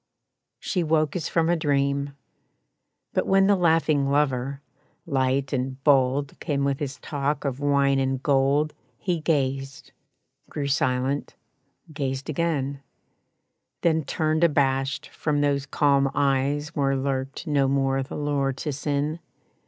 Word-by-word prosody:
She 185 - -1
woke 155 -1 +1
as 165 -3 -2
from 165 -1 +1
a 175 - +3
dream. 140 -2 0 1.0
But - - 0
when 195 0 +4
The 200 +1 +4
laughing 160 -5 +2
lover, 140 -1 0 0.5
light 135 -1 0
and 130 0 -2
bold 140 0 +2
Came 140 -2 -1
with 140 -1 0
his 140 -2 -4
talk 145 0 -2
of 135 -1 -2
wine 140 -1 +2
and 135 0 -1
gold 140 +2 +2 0.2
He 175 -3 -1
gazed, 135 -3 -2 0.6
grew 145 - -3
silent, 135 0 0 0.6
gazed 135 0 -3
again; 140 -3 -1 1.0
Then 160 -2 +2
turned 155 +3 0
abashed 135 -3 +1
from 150 -2 -1
those 140 -1 0
calm 140 -1 +2
eyes 140 +1 +1
Where 135 -2 0
lurked 135 0 -3
no 140 -3 +2
more 135 0 +1
the 130 - -6
lure 145 -2 0
to 145 +3 -4
sin. 145 +3 -2
140 Hz, 130 wpm, -25 LUFS, 135-150 Hz, 1.0 s, when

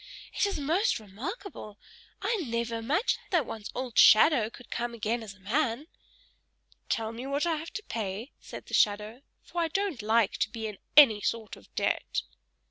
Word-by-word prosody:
"It - - +2
is 400 - -2
most 340 - +1
remarkable: 215 - -7 0.5
I 460 - +1
never 235 - -2
imagined 280 - 0
that 340 -7 +2
one's 220 -2 -7
old 250 -2 -1
shadow 225 -1 +7
could 240 +1 -15
come 235 0 -3
again 230 +1 -1
as 210 -3 -9
a - - -23
man." 235 +6 0 1.0
"Tell 220 -1 -1
me 240 +3 -7
what 285 +3 0
I 330 -2 +1
have 320 +2 -6
to 425 - -5
pay," 220 - -4
said - - -10
the - - -13
shadow; 210 +4 +2 0.2
"for 345 - -3
I 335 - +2
don't 365 - -1
like 220 0 +2
to - - +1
be 220 +1 -6
in 210 -3 -6 0.2
any 225 -9 +9
sort 225 -1 -2
of - - -19
debt." - - 0
235 Hz, 180 wpm, -29 LUFS, 220-310 Hz, 1.0 s, any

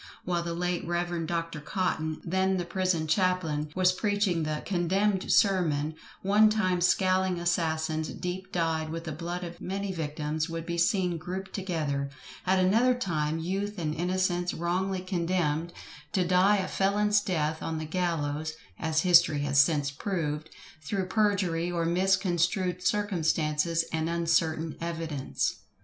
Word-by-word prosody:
While 175 -1 0
the 170 0 -3
late 180 0 -1
Rev. 175 -1 -1
Dr. 165 -2 -2
Cotton, 160 -1 -2
then 190 +2 +1
the 175 - -2
prison 185 -2 0
chaplain, 160 -3 +1
was 185 0 +4
preaching 205 -2 0
the 155 -1 -2
"condemned 190 +2 +1
sermon" 160 -7 +3 0.3
one 210 +3 +5
time 185 -5 +1
scowling 185 0 +2
assassins 160 -2 0
deep 190 +2 -5
dyed 160 -2 0
with 165 +1 -5
the 160 - -5
blood 170 +3 -4
of 175 -1 -8
many 195 +1 -3
victims 155 -1 -3
would 165 0 -4
be 170 0 -2
seen 180 -2 +2
grouped 190 +3 -6
together; 155 -8 -2 0.4
at 190 +1 +4
another 225 +7 +4
time 160 -9 -1
youth 195 +5 -3
and 155 -3 -2
innocence, 180 +1 0
wrongfully 185 +3 -1
condemned 170 -3 -1 0.4
to 185 -2 +2
die 185 +3 +4
a 190 - -1
felon's 205 +1 +2
death 160 -5 -1
on 160 - -3
the 155 - -4
gallows 155 -3 -1 0.3
(as 160 0 +1
history 170 -4 +5
has 140 -1 +2
since 145 -1 +3
proved), 155 -2 -3 0.3
through 185 +5 -2
perjury, 185 -5 +1
or 170 -1 -1
misconstrued 180 0 +1
circumstances 165 -4 +1
and 160 0 0
uncertain 165 -1 +1
evidence. 165 -4 -2
175 Hz, 140 wpm, -28 LUFS, 160-185 Hz, 0.4 s, one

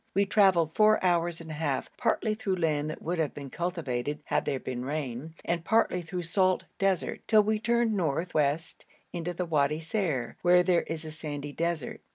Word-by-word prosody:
We 200 +1 +4
travelled 190 -6 +4
four 215 0 +5
hours 170 -1 +1
and 160 -1 -8
a - - -4
half, 150 -3 -1
partly 225 -1 +1
through 210 -4 -1
land 155 -4 0
that 155 - -7
would 175 +1 -2
have 155 -3 -1
been 140 -2 -8
cultivated 150 -6 -2
had - - 0
there 135 - -1
been 125 -1 -4
rain, 145 +1 -4
and 170 -1 -1
partly 220 -3 +2
through 175 +1 -5
salt 185 +2 +2 0.2
desert, 195 -3 0
till 215 -2 +6
we 215 +1 0
turned 235 0 +2
north 175 -2 -1
west 150 +2 -1 0.3
into 175 0 -3
the 180 - -2
Wadi 150 -2 +1
Ser, 160 - -2
where 180 0 +5
there 180 -1 +3
is 160 0 -6
a 155 - -6
sandy 145 -2 -6
desert. 170 -2 -3
165 Hz, 195 wpm, -28 LUFS, 150-185 Hz, 0.3 s, till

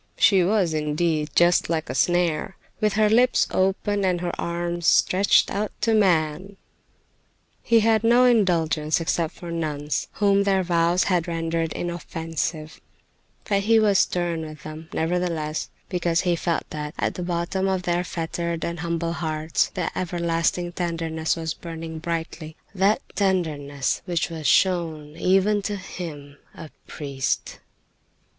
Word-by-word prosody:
She 190 -3 +5
was, 185 -3 +2
indeed, 155 0 0
just 175 +1 +4
like 160 -1 -1
a 130 - -4
snare, 175 +3 +1 0.2
with 215 -2 +1
her 215 +1 +3
lips 245 +4 +4
open 195 +2 0
and 180 -2 +1
her 175 0 -2
arms 170 0 -2
stretched 195 +2 +4
out 210 +1 -2
to 225 +1 +2
man. 185 -1 +1 1.0
He 230 -1 +3
had 220 0 +3
no 240 +2 +5
indulgence 170 -10 +2
except 165 0 -1
for 170 -1 -8
nuns, 150 -3 -2
whom 200 -1 +3
their 195 -1 +2
vows 170 0 +2
had 180 -3 0
rendered 165 -1 -2
inoffensive; 165 -2 -4 0.7
but 200 -1 +2
he 225 +2 +4
was 205 -3 +4
stern 175 -2 0
with 155 -2 -9
them, 155 +1 -9
nevertheless, 165 -2 -2 0.2
because 175 -2 0
he 175 -2 +1
felt 170 0 -2
that 150 0 -5
at - - -1
the - - -6
bottom 175 +2 -1
of 190 -1 0
their 175 0 0
fettered 170 -1 -3
and 170 0 -4
humble 170 0 -2
hearts 155 -1 -1
the - - -2
everlasting 170 0 -1
tenderness 165 -2 -2
was 160 -1 -3
burning 165 -1 -7
brightly—that 170 +4 -2
tenderness 150 -8 -1
which 175 -2 -1
was 160 -2 -3
shown 160 -5 +1
even 195 +4 +2
to 205 +1 -3
him, 150 -7 -8 0.2
a 160 -3 -10 0.2
priest. 140 -3 -3
170 Hz, 140 wpm, -24 LUFS, 160-190 Hz, 1.0 s, She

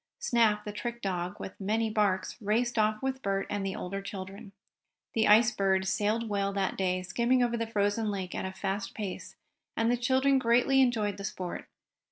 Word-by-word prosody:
Snap, 230 - +2
the 210 - -4
trick 235 +3 -5
dog, 180 -2 -3
with 190 - -8
many 220 +3 +1
barks, 210 -3 0
raced 230 +3 +1
off 215 +1 +1
with 265 0 -2
Bert 195 -2 -1
and 205 -1 -1
the 195 -1 -2
older 195 +2 -4
children. 195 +2 -8 0.6
The 220 -1 +2
Ice 220 +3 +6
Bird 190 -3 +1
sailed 215 +3 0
well 200 -1 0
that 195 -1 -1
day, 185 -1 0
skimming 240 +7 +2
over 240 -1 0
the 230 -1 -2
frozen 210 0 0
lake 190 -3 -4
at - - -3
a 190 - -3
fast 195 +1 -4
pace, 200 -4 -6 0.4
and 225 +1 +2
the 245 - +2
children 265 +2 +3
greatly 250 +2 +4
enjoyed 220 -5 +1
the 200 - -7
sport. 185 -2 -5
210 Hz, 190 wpm, -29 LUFS, 195-235 Hz, 0.6 s, Ice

